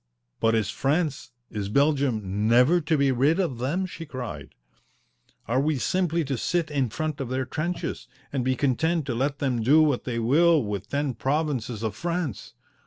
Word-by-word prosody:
"But 115 0 +3
is 110 -2 0
France, 145 +1 -1 0.2
is 100 -2 -3
Belgium, 115 -7 +1
never 125 +10 +5
to 160 0 +1
be 140 -1 +3
rid 140 +8 +2
of 160 -11 -1
them?" 160 +10 -1
she 170 -2 -7
cried. 120 - -7 0.9
"Are 120 +4 +1
we 150 +1 +1
simply 170 +3 0
to 135 -3 -2
sit 170 +2 -1
in 135 -4 0
front 155 +6 -3
of 130 - -4
their 130 +1 -1
trenches 160 +7 -4 0.3
and 135 -3 0
be 130 +1 +1
content 155 +5 +1
to 130 - -2
let 140 +4 -1
them 130 -5 -1
do 150 +8 +5
what 145 -5 +1
they 120 -2 -2
will 150 +6 +4
with 100 -1 -4
ten 140 -1 -1
provinces 130 -4 -2
of 110 -2 -2
France? 170 - -3
135 Hz, 175 wpm, -26 LUFS, 120-155 Hz, 0.9 s, never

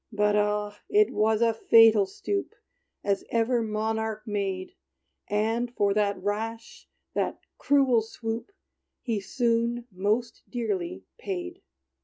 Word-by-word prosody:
But 210 -1 +2
ah! 210 0 0
it 420 0 +4
was 220 +1 +2
a 230 -1 +3
fatal 225 -2 +6
stoop, 395 - -3 0.5
As 200 -1 0
ever 235 +1 +2
monarch 220 0 -2
made; 195 -3 -3 0.5
And, 225 +3 0
for 200 -1 +2
that 205 -1 +1
rash 225 +3 -4 0.2
that - - -1 0.2
cruel 270 -5 +4
swoop, 225 - -5 0.5
He 230 -4 -1
soon 235 +1 0
most 210 +5 -1
dearly 195 - -3 0.2
paid! 185 -3 -5
220 Hz, 115 wpm, -27 LUFS, 205-230 Hz, 0.5 s, fatal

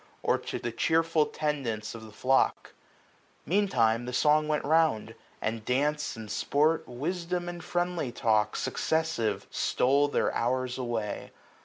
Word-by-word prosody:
Or - - +2
to - - -5
the 120 - -4
cheerful 160 +3 +2
tendance 135 -8 -2
of 115 -1 -9
the 110 - -12
flock* 130 +5 +1 0.7
Meantime 120 - +2
the 125 - -4
song 150 +3 +3
went 150 -1 0
round 155 -7 +2 0.2
} - - -32
and 110 0 -2
dance 145 +5 0
and 110 -2 -8
sport. 155 +8 +1
Wisdom 175 +7 -3
and 175 -1 -6
friendly 175 -7 -1
talk, 110 -2 +1
successive, 160 -10 -1
stole 140 +3 +2
Their 145 - 0
hours 130 +1 -1
away. 115 -4 -3
140 Hz, 140 wpm, -29 LUFS, 115-160 Hz, 0.7 s, song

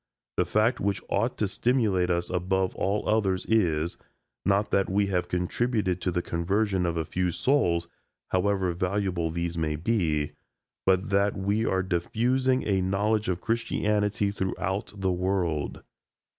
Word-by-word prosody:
The - - +3
fact 110 +4 +2
which 100 0 0
ought 115 +5 0
to 105 - +1
stimulate 105 -4 +1
us 85 0 0
above 95 +1 0
all 100 +2 -1
others 100 -4 +1
is, 85 -7 +1 0.4
not 100 +1 +1
that 100 - +2
we 100 +2 +2
have 90 -1 +1
contributed 95 +1 0
to - - 0
the 90 0 -1
conversion 95 +2 0
of 85 -1 -1
a 80 - -1
few 90 +3 -1
souls, 85 - +1 0.4
however 95 -1 +1
valuable 90 -2 -1
these 85 +1 -3
may 75 -1 0
be, 80 -5 0 0.6
but 95 +2 +2
that 100 +1 +2
we 100 +3 0
are 95 0 +1
diffusing 125 +9 +1
a 95 -2 +2
knowledge 105 +3 +1
of 90 -1 -1
Christianity 105 -3 0
throughout 95 0 -2
the 95 -1 0
world. 90 -5 -1
95 Hz, 145 wpm, -27 LUFS, 90-105 Hz, 0.6 s, The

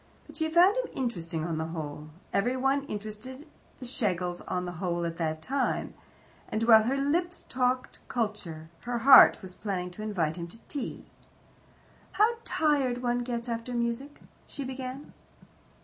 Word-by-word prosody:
But - - -14
she 315 -1 0
found 355 +5 +6
him - - 0
interesting 170 -10 -3
on 165 -2 -2
the 160 - -2
whole 155 -2 -6 0.2
every 245 +6 +1
one 270 +2 +1
interested 215 +8 -7 0.3
the 255 - -7
Schlegels 180 -8 -1
on 180 0 -1
the 175 - -4
whole 175 -2 -1
at 165 0 -4
that 160 -2 -2
time 270 +4 -1 0.6
and 220 - -1
while 225 -1 +8
her 265 +4 +1
lips 345 +6 0
talked 255 0 0
culture, 185 -9 -3
her 245 0 -3
heart 265 -2 +8
was 185 -1 -7
planning 185 -2 -3
to 180 - -10
invite 180 -7 -1
him 170 -1 -5
to 175 - -13
tea. 285 - -4 1.1
"How 455 +3 +3
tired 270 -5 +1
one 245 0 +1
gets 240 -1 -3
after 235 +1 -3
music!" 235 +5 -2 0.3
she 280 - -6
began. 260 +1 -6
235 Hz, 160 wpm, -29 LUFS, 180-265 Hz, 1.1 s, while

